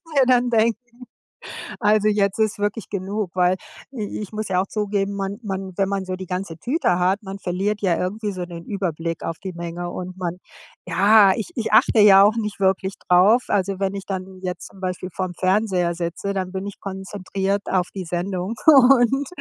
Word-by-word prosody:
mir 270 -2 +5
dann 250 -1 +3
denken: 225 -1 +2 1.0
„Also 210 -1 +3
jetzt 200 -1 +1
ist 215 -1 +1
wirklich 205 0 -3
genug.“ 200 0 -3
Weil 180 +1 +3 0.4
i 215 -3 -5
ich 205 - -7
muss 215 -1 -4
ja 180 -1 +2
auch 195 - -4
zugeben, 200 -1 -1
man 195 0 -3
man 190 -2 -4
wenn 195 -1 +2
man 195 -1 -2
so 185 0 -4
die 185 0 -7
ganze 180 -2 -4
Tüte 245 - 0
hat, 185 +4 +1
man 195 -1 -7
verliert 195 +3 -2
ja 180 -4 +2
irgendwie 210 +3 -2
so 185 -2 -5
den 170 -1 -9
Überblick 170 -4 -3
auf 165 - -4
die 190 -1 -6
Menge 170 +1 -5
und 185 +1 -7
man 180 -1 -3 0.5
ja, 200 +3 +6
ich 230 - -5
ich 230 -4 -2
achte 220 - +5
ja 200 -1 +8
auch 215 +2 +4
nicht 210 -3 -3
wirklich 190 0 +1
drauf. 200 +8 +5
Also, 195 -1 0
wenn 195 0 -1
ich 195 -1 -6
dann 190 -1 -6
jetzt 180 -1 -5
zum 195 - -17
Beispiel 185 0 -4
vorm 185 -2 -3
Fernseher 185 -2 +1
sitze, 175 +3 -3
dann 185 -1 -3
bin 190 +1 -4
ich 200 - -8
konzentriert 195 0 -3
auf 180 -2 +1
die 190 - -4
Sendung 180 +4 -3
und 270 -2 +6
195 Hz, 195 wpm, -22 LUFS, 185-210 Hz, 1.0 s, ja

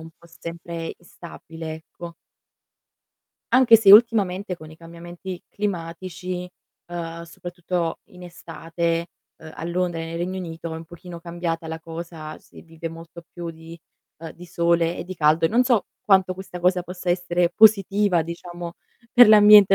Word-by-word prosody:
un 160 0 -11
po' 170 - -20
sempre 170 0 -7
instabile, 165 -2 -9
ecco. 170 +1 -11 1.4
Anche 255 -3 +8
se 205 -3 +7
ultimamente 200 -4 +5
con 155 -1 -12
i 155 - -14
cambiamenti 175 +2 -9
climatici, 180 -1 -5 0.4
ehm, 170 -1 -6
soprattutto 175 0 -4
in 180 0 -16
estate, 170 0 -3 0.3
ehm, 160 0 -12
a - - -9
Londra 175 -1 -1
e 165 - -5
nel 165 +1 -6
Regno 185 +2 -3
Unito 165 -2 -6
è - - -4
un 160 0 -10
pochino 175 0 -11
cambiata 170 -1 -4
la 160 0 -5
cosa, 160 -1 -8
si - - -16
vive 165 0 -7
molto 165 +1 -11
più 175 -1 -6
di, 165 +1 -12 0.4
ehm, 165 - -7
di 180 +1 -13
sole 170 0 +1
e - - -5
di 185 +1 -7
caldo, 155 0 +3
e 165 - +4
non 245 +3 +3
so 240 -5 +2 0.2
quanto 190 -5 +3
questa 185 -1 -9
cosa 180 0 +2
possa 180 0 -4
essere 175 -1 +1
positiva 205 -4 +4
diciamo 170 +1 -7 0.4
per 245 -2 +8
l'ambiente 210 -2 +8
175 Hz, 160 wpm, -23 LUFS, 165-185 Hz, 1.4 s, Anche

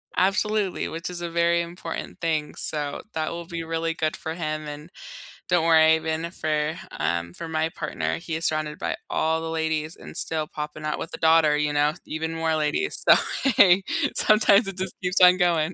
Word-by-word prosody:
Absolutely, 200 +1 +1
which 165 +3 -5
is 175 -1 -5
a 170 - -3
very 170 0 +2
important 170 0 -7
thing, 155 -2 -1
so, 145 -2 -2
that 155 -1 -2
will 170 0 -6
be 170 -1 -5
really 165 0 -2
good 155 -2 -1
for 160 0 -5
him 155 -2 -4
and 150 +3 -9 0.6
don't 175 -2 +2
worry, 160 -1 +5
been 160 +1 -2
it 170 - -8
for, 155 -1 -1 0.2
um, 85 0 -1
for 165 - -7
my 160 0 -1
partner, 150 -2 -3
he 165 -1 -5
is 165 - -3
surrounded 155 -1 -1
by - - -3
all 160 0 +1
the 165 0 -5
ladies 160 0 -2
and - - -9
still 160 -1 0
popping 150 0 -7
out 150 0 -2
with - - -6
a - - -9
daughter, 160 -2 +4
you 150 0 0
know, 145 +1 +2
even 160 +1 -4
more 165 -1 0
ladies. 155 - -1
So, - - +9 1.0
sometimes 215 0 +4
it 195 -1 -6
just 185 0 -4
keeps 180 +1 0
on 180 0 +8
going. 175 -2 +1
160 Hz, 195 wpm, -24 LUFS, 155-170 Hz, 1.0 s, So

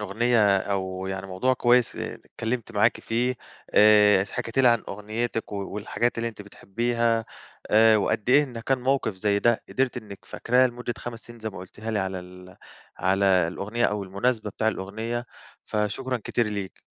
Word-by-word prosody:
الأغنية 105 0 +3
أو 95 -1 -3
يعني 95 0 -4
موضوع 95 +8 +1
كويس 120 -1 +3
اتكلمت 115 0 -5
معاكِ 110 +2 +2
فيه، 125 +3 0 0.4
آآ 105 -2 +6
حكيتِ 115 +4 -5
لي 130 -2 +6
عن 115 -1 +3
أغنيتِك 110 +3 -4
و - - -3 0.2
والحاجات 115 +3 -1
اللي 115 0 -1
أنتِ 110 -2 -10
بتحبيها، 115 +3 -1 0.5
آآ 110 +1 +6
وقد 105 +2 0
إيه 145 +3 +6
إن 120 -4 -8
كان 130 +3 0
موقف 130 -4 0
زي 100 +2 +1
ده 120 +2 +2
قدرتِ 130 -1 0
إنِك 105 -4 -9
فاكراه 125 +2 +2
لمدة 120 -1 -5
5 115 -1 -7
سنين 120 0 -12
زي 110 0 -4
ما 100 - -10
قُلتيها 105 +4 -7
لي 110 - 0
على 95 -1 -2
ال 90 0 -13 0.4
على 95 +2 +1 0.2
الأغنية 105 +7 -2
أو 105 -2 0
المناسبة 105 +3 -1
بتاع 110 +2 0
الأغنية، 110 +4 -4 0.4
فشكرًا 115 +4 -2
كتير 120 - 0
ليكِ. 100 -3 -5
110 Hz, 165 wpm, -25 LUFS, 100-120 Hz, 0.5 s, آآ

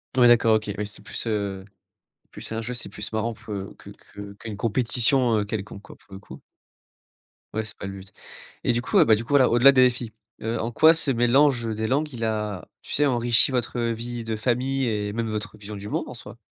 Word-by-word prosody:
Ouais, 125 -1 +6
d'accord 115 -2 +5
OK, 105 -1 -6
oui 105 - -2
c'est 105 - -11
plus, - - -4
heu, 100 -3 -2 0.6
c'est - - -44
plus - - -4
un 115 - -2
jeu, 125 - -4
c'est 120 - -2
plus 105 +2 -6
marrant, 110 +1 -1
peu 100 -2 -7
que - - -13
que 100 0 -12
qu'une 105 0 -8
compétition, 120 +1 +1
heu, 105 - 0
quelconque, 100 -1 -6
quoi, - - -14
pour 95 - -16
le 95 - -9
coup. - - -12 1.1
Ouais, 110 - -1
c'est 110 - -9
pas - - -7
le 100 - -5
but, 95 0 -14 0.5
et - - +2
du 120 - 0
coup, 200 - 0
ah 170 - +7
bah 110 - +5
du 110 +2 +1
coup, - - -18
voilà, 140 -3 +5
au-delà 120 +4 +6
des 130 -1 +5
défis, 120 -2 -1 0.3
heu, 115 +1 -2
en 115 +2 -2
quoi 160 +7 +6
ce 160 -4 +1
mélange, 120 0 +3
heu, 110 - -2
des 110 +1 -2
langues, 145 +6 0
il 115 -3 -6
a 105 -5 -2
tu - - -8
sais, 145 - +3
enrichi 120 -1 +3
votre 125 -1 -2
vie 115 0 -3
de 110 -1 -3
famille 130 +3 0
et 105 -1 -2
même 115 0 -2
votre 105 0 -5
vision 105 0 -9
du 100 0 -8
monde, - - -2
en - - -8
soi? - - -11
115 Hz, 240 wpm, -24 LUFS, 105-125 Hz, 1.1 s, ah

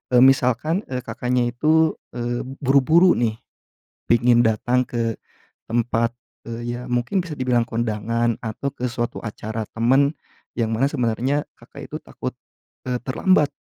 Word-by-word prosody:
eee, 125 - +8
misalkan, 135 - +3
eee, 125 -1 -3
Kakaknya 125 +1 0
itu, 155 +4 +3 0.2
eee, 120 0 -2 0.2
buru-buru, 155 +7 +5
nih, 115 -2 0 0.7
pingin 120 0 +5
datang 120 +3 +2
ke 115 -2 -2 0.5
tempat, 115 0 +1 0.4
eee, 120 +1 -4
ya, - - -7
mungkin 120 +11 +1
bisa 170 - -8
dibilang 125 -2 +2
kondangan 115 0 0
atau 115 +5 -3
ke 125 - -3
suatu 120 0 -3
acara 110 0 -4
teman, 135 +5 +3 0.5
yang 115 -1 0
mana 135 +5 +2
sebenarnya 130 +2 0
Kakak - - -11
itu - - -5
takut, - - -6 0.5
e 125 -1 0
terlambat 150 +3 +3
120 Hz, 135 wpm, -22 LUFS, 115-135 Hz, 0.7 s, eee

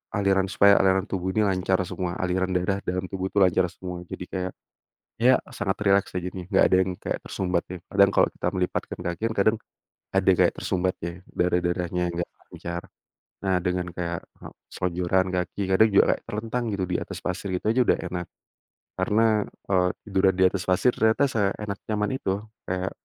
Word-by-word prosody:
aliran 95 -2 +2
supaya 100 +1 +5
aliran 95 0 +3
tubuh 95 -1 -2
ini 110 - +3
lancar 95 -1 +1
semua 90 -1 -4
aliran 90 0 0
darah 95 +2 +1
dalam 90 +1 -1
tubuh 95 -1 -2
tuh 100 0 +3
lancar 90 0 +3
semua 90 0 -7
jadi - - -6
kayak, 95 -1 -2 0.7
ya 130 +1 +6 0.2
sangat 95 -2 -1
rileks 100 0 +4
aja 90 - -4
nih 90 -1 -5
gak - - +5
ada - - +4
yang 95 - -2
kayak - - -3
tersumbat 90 -2 -1
ya. 90 - -5
Kadang 100 0 +4
kalau - - +4
kita - - -5
melipatkan 90 -1 -2
kaki 85 +1 -3
kan - - -4
kadang, 110 +3 +4 0.6
ada - - +3
kayak - - +4
tersumbat 90 0 -1
ya, 85 +1 -5
darah-darahnya 90 0 0 0.2
gak - - -13 0.2
lancar. 85 0 -6 0.6
Nah, 95 -2 +2
dengan 90 -1 -2
kayak 85 -1 -4 0.5
selonjoran 90 +1 0
kaki 90 +2 -2
kadang 105 +4 +5
juga 100 - +5
kayak - - -15
terlentang 115 +3 -2
gitu 100 -2 -1
di 90 - -2
atas - - -7
pasir 95 +2 -4
itu 90 - -3
aja 120 +3 +3
udah - - +3
enak, 90 0 -4 0.7
karena, 110 +2 +2 0.5
eee, 90 -2 +3 0.2
tiduran 95 -1 +3
di 95 - +6
atas 90 -1 -4
pasir 95 +7 +3
ternyata 110 +6 +3
seenak 105 -3 -1
nyaman 105 -1 -1
itu, 95 - -2 0.3
kayak, 95 +1 -2
95 Hz, 180 wpm, -25 LUFS, 90-100 Hz, 0.7 s, ya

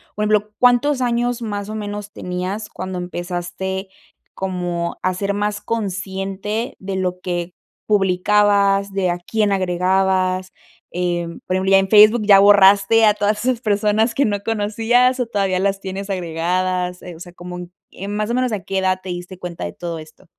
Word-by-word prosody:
por 210 - -2
ejemplo, 210 0 +1
¿cuántos 250 +3 +3
años 240 0 0
más 205 -2 -4
o 215 - -5
menos 205 -1 -5
tenías 185 +3 -4
cuando 185 -1 -6
empezaste 180 +2 -4 0.4
como 175 -2 -3
a 185 - +1
ser 200 +2 -2
más 210 +1 -1
consciente 195 +1 -3
de 190 0 -5
lo 180 -1 -2
que 175 -1 -3 0.3
publicabas, 200 0 +3
de 190 -2 0
a 175 - -3
quién 210 +3 0
agregabas?, 185 0 +1 0.4
em, 175 -1 -2
por 185 - 0
ejemplo, 190 +1 +3
en 195 0 +3
Facebook 215 +2 +7
¿ya 200 -1 +7
borraste 200 +2 +6
a 210 - +5
todas 210 +1 -1
esas 255 -2 0
personas 210 +1 +1
que 280 - +2
no 205 -2 -1
conocías 225 +4 +1
o - - 0
todavía 195 -4 0
las 195 0 0
tienes 195 +1 -6
agregadas?, 180 +1 -1
eh, 175 -2 -9
o 160 - -14
sea, 175 -1 -10
como 180 0 -8
en 175 0 -9 0.2
en 200 +2 -5
más 210 0 -1
o - - 0
menos, 255 -1 0
¿a 210 -3 -2
qué 195 +2 -2
edad 185 0 +1
te 185 - -7
diste 175 +1 -6
cuenta 175 - -6
de 85 - -6
todo 170 -2 -5
esto? 155 0 -15
195 Hz, 175 wpm, -20 LUFS, 180-210 Hz, 0.4 s, Facebook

